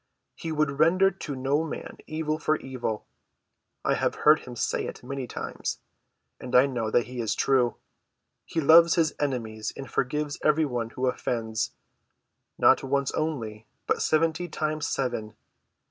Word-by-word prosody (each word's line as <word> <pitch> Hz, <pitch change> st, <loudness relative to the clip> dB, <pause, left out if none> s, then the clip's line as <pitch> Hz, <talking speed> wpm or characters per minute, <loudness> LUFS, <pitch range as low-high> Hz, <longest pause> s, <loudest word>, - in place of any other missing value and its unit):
"He 165 Hz, -, -6 dB
would 150 Hz, -2 st, 0 dB
render 185 Hz, +5 st, +5 dB
to 160 Hz, -7 st, -6 dB
no 135 Hz, +4 st, +1 dB
man 160 Hz, -, -7 dB
evil 155 Hz, 0 st, -2 dB
for 155 Hz, 0 st, +2 dB
evil. 125 Hz, -5 st, -4 dB, 0.8 s
I -, -, +3 dB
have -, -, 0 dB
heard 150 Hz, +1 st, +8 dB
him 125 Hz, -, -10 dB
say -, -, -1 dB
it -, -, -8 dB
many 135 Hz, 0 st, -4 dB
times, -, -, -4 dB, 0.6 s
and 125 Hz, -, -4 dB
I 125 Hz, +2 st, +8 dB
know 120 Hz, -5 st, -2 dB
that 120 Hz, +2 st, +2 dB
he 125 Hz, 0 st, -5 dB
is 110 Hz, -1 st, -1 dB
true. 125 Hz, -3 st, +2 dB, 0.7 s
He 165 Hz, -, -3 dB
loves 165 Hz, +2 st, +7 dB
his 165 Hz, -3 st, +2 dB
enemies 115 Hz, -6 st, -2 dB
and 135 Hz, -, -6 dB
forgives 145 Hz, +4 st, -1 dB
every 155 Hz, +1 st, +4 dB
one 120 Hz, -4 st, -2 dB
who 125 Hz, +3 st, -3 dB
offends—not 115 Hz, -1 st, -1 dB
once 140 Hz, 0 st, 0 dB
only, 115 Hz, -9 st, -3 dB, 0.2 s
but -, -, 0 dB
seventy 160 Hz, +2 st, +1 dB
times 155 Hz, -1 st, -2 dB
seven. 115 Hz, -5 st, -2 dB
135 Hz, 150 wpm, -27 LUFS, 120-155 Hz, 0.8 s, heard